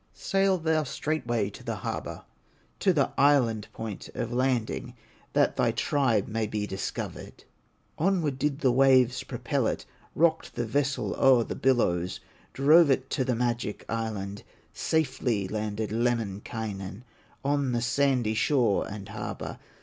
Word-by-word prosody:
Sail 195 Hz, -1 st, +2 dB
thou 160 Hz, -1 st, +1 dB
straightway 120 Hz, -9 st, -2 dB
to -, -, -12 dB
the -, -, -3 dB
harbor, -, -, -5 dB, 0.6 s
To 190 Hz, -, +4 dB
the 145 Hz, -6 st, +1 dB
island 125 Hz, -7 st, +3 dB
point 110 Hz, -3 st, -6 dB
of 120 Hz, +1 st, -3 dB
landing 125 Hz, -1 st, -1 dB, 0.4 s
That -, -, +2 dB
thy -, -, +3 dB
tribe 125 Hz, -8 st, +1 dB
may 110 Hz, 0 st, -1 dB
be 105 Hz, -1 st, -2 dB
discovered." 95 Hz, -1 st, -5 dB, 0.6 s
Onward 160 Hz, -6 st, +1 dB
did 150 Hz, +1 st, -1 dB
the 130 Hz, -, +4 dB
waves 130 Hz, -1 st, +4 dB
propel -, -, -1 dB
it, -, -, -3 dB, 0.3 s
Rocked 160 Hz, 0 st, +1 dB
his 120 Hz, -, -1 dB
vessel 140 Hz, +3 st, 0 dB
o'er 130 Hz, -3 st, +6 dB
the -, -, -5 dB
billows, 90 Hz, -9 st, +1 dB, 0.3 s
Drove 150 Hz, +4 st, +6 dB
it 130 Hz, -1 st, +1 dB
to 130 Hz, -, +1 dB
the 125 Hz, -1 st, 0 dB
magic 120 Hz, -3 st, -2 dB
island, 105 Hz, -3 st, -3 dB, 0.3 s
Safely 125 Hz, -9 st, 0 dB
landed 105 Hz, +1 st, -3 dB
Lemminkainen 110 Hz, -2 st, -2 dB, 0.4 s
On 140 Hz, -2 st, +1 dB
the 120 Hz, -1 st, 0 dB
sandy 125 Hz, -3 st, +2 dB
shore 120 Hz, -2 st, +2 dB
and 100 Hz, -1 st, -7 dB
harbor. -, -, -6 dB
120 Hz, 135 wpm, -28 LUFS, 110-140 Hz, 0.6 s, o'er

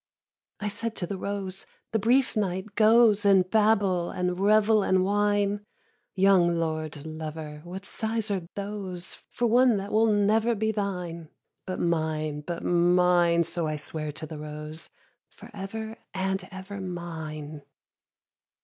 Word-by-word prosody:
5. -, -, -3 dB
I -, -, +1 dB
said 225 Hz, +2 st, -3 dB
to 180 Hz, -, -2 dB
the 195 Hz, -, -4 dB
rose, 195 Hz, -1 st, -4 dB, 0.2 s
'The 225 Hz, -, +1 dB
brief 250 Hz, +6 st, +3 dB
night 195 Hz, 0 st, -2 dB
goes 220 Hz, 0 st, +5 dB
In 195 Hz, -2 st, +6 dB
babble 200 Hz, -3 st, +2 dB
and 180 Hz, 0 st, -2 dB
revel 215 Hz, +2 st, +4 dB
and 185 Hz, -1 st, +2 dB
wine. 205 Hz, 0 st, +1 dB, 0.5 s
young 185 Hz, -3 st, +4 dB
lord 155 Hz, -2 st, -3 dB
lover, 155 Hz, -1 st, -6 dB
what 185 Hz, +3 st, -8 dB
sighs 220 Hz, 0 st, -2 dB
are 185 Hz, -4 st, -2 dB
those, 195 Hz, -3 st, -5 dB, 0.2 s
For 240 Hz, -, -1 dB
one 240 Hz, 0 st, +5 dB
that 200 Hz, +1 st, -5 dB
will 220 Hz, +1 st, +4 dB
never 215 Hz, +3 st, +3 dB
be 220 Hz, +1 st, 0 dB
thine? 180 Hz, -6 st, -4 dB, 0.4 s
But 185 Hz, -, -3 dB
mine, 155 Hz, -3 st, -1 dB
but 170 Hz, +2 st, -5 dB
mine,' 175 Hz, -1 st, +4 dB
so 170 Hz, 0 st, -2 dB
I 155 Hz, -, -1 dB
sware 150 Hz, 0 st, -5 dB
to 155 Hz, -, -7 dB
the 155 Hz, -1 st, -8 dB
rose, 150 Hz, +1 st, -7 dB, 0.4 s
'For -, -, -14 dB
ever 220 Hz, +3 st, -6 dB, 0.2 s
and 190 Hz, 0 st, -1 dB
ever, 190 Hz, +1 st, -7 dB
mine.' 160 Hz, -4 st, -6 dB
190 Hz, 145 wpm, -27 LUFS, 170-205 Hz, 0.5 s, In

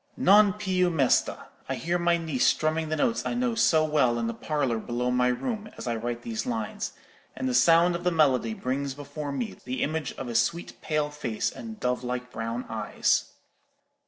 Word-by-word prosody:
'Non 200 Hz, +1 st, +6 dB
più 190 Hz, -3 st, +1 dB
mesta'—I 140 Hz, -6 st, 0 dB
hear 175 Hz, +2 st, -1 dB
my 170 Hz, 0 st, +3 dB
niece 160 Hz, -6 st, 0 dB
strumming 155 Hz, 0 st, +1 dB
the 155 Hz, -, 0 dB
notes 230 Hz, +9 st, +1 dB
I -, -, -2 dB
know 245 Hz, -1 st, 0 dB
so 160 Hz, -8 st, +3 dB
well 140 Hz, -6 st, +2 dB
in 115 Hz, -, -1 dB
the 115 Hz, -, -2 dB
parlour 130 Hz, -1 st, -1 dB
below 125 Hz, +2 st, -2 dB
my 125 Hz, 0 st, +2 dB
room, 215 Hz, -, -2 dB
as -, -, -7 dB
I 120 Hz, -1 st, -1 dB
write 120 Hz, +1 st, -4 dB
these 115 Hz, -2 st, -4 dB
lines, 115 Hz, -3 st, -3 dB, 0.4 s
and -, -, -2 dB
the 125 Hz, -, 0 dB
sound 165 Hz, +8 st, +5 dB
of 170 Hz, -, -5 dB
the 180 Hz, -, +3 dB
melody 135 Hz, -9 st, +2 dB
brings 135 Hz, +3 st, -2 dB
before 145 Hz, +1 st, -6 dB
me 115 Hz, -9 st, -4 dB
the 130 Hz, +1 st, -2 dB
image 155 Hz, 0 st, -2 dB
of 130 Hz, -, -6 dB
a 120 Hz, -, -4 dB
sweet 170 Hz, +8 st, -1 dB
pale 150 Hz, -1 st, -1 dB
face 135 Hz, -7 st, -2 dB
and 220 Hz, -2 st, -9 dB
dove 125 Hz, -4 st, -1 dB
like 125 Hz, 0 st, -4 dB
brown 115 Hz, +2 st, -4 dB
eyes. 110 Hz, -2 st, 0 dB
140 Hz, 190 wpm, -27 LUFS, 125-170 Hz, 0.4 s, Non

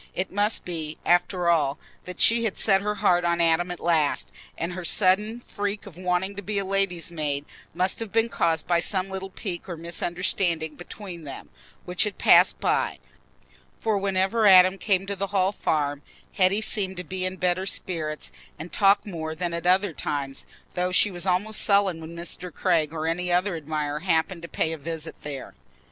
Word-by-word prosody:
It 185 Hz, +1 st, -2 dB
must 205 Hz, +3 st, 0 dB
be, 160 Hz, -3 st, -4 dB
after 175 Hz, 0 st, +2 dB
all, 155 Hz, -4 st, +2 dB, 0.3 s
that 180 Hz, -1 st, -8 dB
she 230 Hz, 0 st, +4 dB
had 220 Hz, -4 st, -1 dB
set 195 Hz, -2 st, +4 dB
her 210 Hz, +1 st, -1 dB
heart 175 Hz, -3 st, +2 dB
on 170 Hz, 0 st, +1 dB
Adam 170 Hz, +1 st, +3 dB
at 180 Hz, -, -5 dB
last, 160 Hz, -4 st, +1 dB, 0.3 s
and 170 Hz, +2 st, -3 dB
her 185 Hz, 0 st, -6 dB
sudden 210 Hz, +6 st, +2 dB
freak 205 Hz, -2 st, -4 dB
of 195 Hz, -6 st, -11 dB
wanting 180 Hz, +2 st, -1 dB
to 200 Hz, -, -5 dB
be 205 Hz, +1 st, -3 dB
a 200 Hz, -, 0 dB
lady's 190 Hz, -3 st, -1 dB
maid 145 Hz, -3 st, -2 dB, 0.3 s
must 185 Hz, +2 st, +1 dB
have 225 Hz, -3 st, -5 dB
been 225 Hz, +1 st, +2 dB
caused 165 Hz, -8 st, 0 dB
by 175 Hz, -1 st, +2 dB
some 185 Hz, +2 st, 0 dB
little 190 Hz, 0 st, -5 dB
pique 190 Hz, -2 st, -6 dB
or 170 Hz, -, -5 dB
misunderstanding 170 Hz, -1 st, -2 dB
between 175 Hz, -1 st, -9 dB
them, 140 Hz, -2 st, -9 dB, 0.4 s
which 180 Hz, 0 st, +1 dB
had 210 Hz, -2 st, -3 dB
passed -, -, +5 dB
by. -, -, 0 dB, 0.8 s
For 220 Hz, -2 st, 0 dB
whenever 195 Hz, +2 st, +2 dB
Adam 185 Hz, 0 st, +7 dB
came 195 Hz, -1 st, +1 dB
to 200 Hz, 0 st, -3 dB
the 195 Hz, +1 st, -3 dB
Hall 190 Hz, -1 st, +1 dB
Farm, 145 Hz, -7 st, -1 dB, 0.3 s
Hetty 195 Hz, +3 st, +3 dB
seemed 195 Hz, -3 st, 0 dB
to 180 Hz, -, -4 dB
be 185 Hz, +2 st, -5 dB
in 185 Hz, 0 st, -2 dB
better 185 Hz, +1 st, 0 dB
spirits 155 Hz, -6 st, -3 dB, 0.3 s
and 165 Hz, +2 st, -9 dB
to -, -, -4 dB
talk 200 Hz, 0 st, +5 dB
more 160 Hz, -5 st, -5 dB
than 175 Hz, +1 st, -3 dB
at 170 Hz, +1 st, -3 dB
other 185 Hz, 0 st, +3 dB
times, 140 Hz, -2 st, -4 dB, 0.3 s
though 180 Hz, 0 st, -1 dB
she 200 Hz, +2 st, +4 dB
was 175 Hz, +1 st, -4 dB
almost 205 Hz, +4 st, +1 dB
sullen 200 Hz, -5 st, +3 dB
when 160 Hz, +1 st, -9 dB
Mr. 175 Hz, +1 st, -5 dB
Craig 165 Hz, -4 st, +1 dB
or 160 Hz, -1 st, -4 dB
any 175 Hz, +2 st, -1 dB
other 180 Hz, +1 st, +1 dB
admirer 150 Hz, -1 st, -3 dB
happened 170 Hz, +1 st, 0 dB
to 170 Hz, -, -7 dB
pay 160 Hz, -, -1 dB
a 160 Hz, -, -6 dB
visit 160 Hz, +1 st, -6 dB
there. 140 Hz, -3 st, -6 dB
180 Hz, 190 wpm, -25 LUFS, 165-195 Hz, 0.8 s, Adam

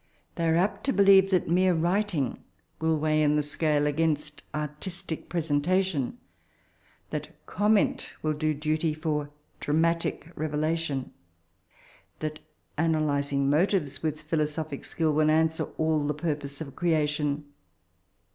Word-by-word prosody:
They 165 Hz, -1 st, -1 dB
are 160 Hz, -, +3 dB
apt 195 Hz, +4 st, +1 dB
to 275 Hz, -, +2 dB
believe 195 Hz, -1 st, +6 dB
that 185 Hz, -3 st, +2 dB
mere 180 Hz, +2 st, +3 dB
writing 175 Hz, -, 0 dB, 0.4 s
will 160 Hz, 0 st, +2 dB
weigh 155 Hz, 0 st, +2 dB
in 150 Hz, 0 st, +3 dB
the 150 Hz, -, +2 dB
scale 150 Hz, 0 st, +1 dB
against 150 Hz, -1 st, 0 dB
«rtistic 150 Hz, +3 st, -5 dB
presentation; 165 Hz, -, 0 dB, 0.9 s
that -, -, -4 dB, 0.2 s
comment 210 Hz, 0 st, +1 dB
will 155 Hz, 0 st, +1 dB
do 155 Hz, 0 st, 0 dB
dntv 155 Hz, +1 st, -1 dB
for 150 Hz, -2 st, -1 dB, 0.3 s
dramatic 165 Hz, +2 st, 0 dB
revdation; 155 Hz, -2 st, -1 dB, 1.1 s
that 155 Hz, 0 st, -4 dB, 0.4 s
analysiog 145 Hz, -3 st, +1 dB
motives 155 Hz, 0 st, +1 dB
with 155 Hz, -1 st, -2 dB
philosophic 155 Hz, -1 st, -2 dB
skill 160 Hz, -2 st, 0 dB
will 155 Hz, +1 st, +3 dB
answer 160 Hz, +1 st, +2 dB
all 160 Hz, -1 st, +2 dB
the 145 Hz, 0 st, -1 dB
tmrpose 145 Hz, -3 st, -3 dB
of 140 Hz, -4 st, -7 dB
creation. 150 Hz, -3 st, 0 dB
155 Hz, 120 wpm, -27 LUFS, 150-165 Hz, 1.1 s, believe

